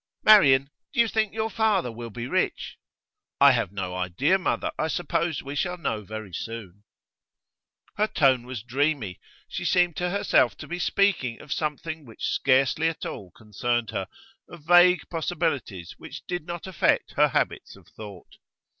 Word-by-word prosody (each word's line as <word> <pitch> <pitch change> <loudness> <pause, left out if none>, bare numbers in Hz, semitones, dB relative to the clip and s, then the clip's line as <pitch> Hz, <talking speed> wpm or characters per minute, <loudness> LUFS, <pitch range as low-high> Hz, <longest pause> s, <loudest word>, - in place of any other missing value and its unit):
'Marian, 140 -10 +6 0.2
do 265 - -3
you 235 - +5
think 220 -2 0
your 220 0 -2
father 200 - +1
will 115 +1 -8
be 115 +2 -6
rich?' 185 +8 -2 0.6
'I 140 0 +8
have 120 -7 0
no 95 -2 -4
idea, 95 - +1
mother. 185 - -1
I 155 - +1
suppose 170 -1 -1
we 140 - -6
shall 180 +5 -2
know 110 -10 -2
very 110 -2 -8
soon.' 105 -3 -7 1.1
Her 210 +1 +2
tone 130 - +2
was 125 -5 -6
dreamy. 130 - -1 0.3
She - - -5
seemed 175 -3 +2
to 180 0 -1
herself 200 +3 +2
to - - -9
be 175 +1 -5
speaking 180 -12 +1
of 145 - -5
something 155 +1 -4
which 115 -5 -7
scarcely 135 +4 +2
at 165 - -6
all 95 - -7
concerned 115 +3 -3
her, 95 - -3 0.4
of 170 -4 -13
vague 175 +1 +5
possibilities 155 - -2
which - - -10
did 175 -2 -4
not 175 -1 -6
affect 190 -4 +1
her - - +4
habits - - -2
of - - -19
thought. 100 -5 -12
140 Hz, 165 wpm, -25 LUFS, 115-175 Hz, 1.1 s, I